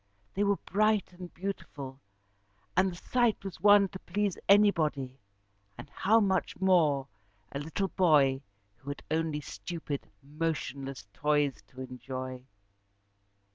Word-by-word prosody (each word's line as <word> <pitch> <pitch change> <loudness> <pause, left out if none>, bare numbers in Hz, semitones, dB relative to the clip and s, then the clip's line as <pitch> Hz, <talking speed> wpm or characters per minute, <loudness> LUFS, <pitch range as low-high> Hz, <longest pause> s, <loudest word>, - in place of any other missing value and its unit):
They 200 - +1
were 200 0 +3
bright 215 -1 +1
and 180 -1 -9
beautiful, 155 -8 -6 0.7
and 185 +1 +4
the - - -8
sight 240 +3 +1
was 190 -4 -7
one 205 0 +7
to 190 - -8
please 200 +1 -1
anybody, 155 -10 +3 0.6
and - - -10
how 220 +4 +3
much 190 -5 0
more 160 -8 +3 0.4
a 140 - -4
little 160 +6 -2
boy 145 -8 +4 0.4
who 135 +3 -10
had 145 - -6
only 160 -2 0
stupid, 155 -2 -6
motionless 140 -4 -4
toys 145 -2 +1
to 130 - -11
enjoy. 130 0 -6
165 Hz, 125 wpm, -30 LUFS, 140-195 Hz, 0.7 s, one